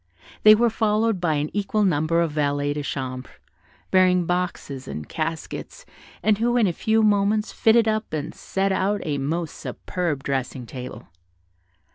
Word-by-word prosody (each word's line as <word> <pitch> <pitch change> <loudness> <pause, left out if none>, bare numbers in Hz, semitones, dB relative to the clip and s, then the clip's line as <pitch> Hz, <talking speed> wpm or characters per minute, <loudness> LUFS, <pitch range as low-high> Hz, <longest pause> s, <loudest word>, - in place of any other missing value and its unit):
They 215 0 +9
were 235 +1 +2
followed 215 -2 +1
by 160 -3 +1
an 150 +1 -2
equal 210 +1 0
number 165 -2 +2
of 165 -2 0
valets 145 -1 0
de 150 - -3
chambre, 130 -2 -5 0.6
bearing 180 -1 +4
boxes 170 -6 -3
and 75 - -6
caskets, 165 - -5 0.4
and 215 -1 +3
who 240 +2 +2
in 235 - +4
a 180 - +1
few 220 +5 +1
moments 210 +1 +2
fitted 225 0 +4
up 215 0 -1
and 155 +1 -4
set 195 0 -1
out 195 +2 0
a 145 -2 -1
most 160 +4 -2
superb 165 -7 -4
dressing 135 -2 -3
table. 125 +1 -8
175 Hz, 155 wpm, -23 LUFS, 145-210 Hz, 0.6 s, They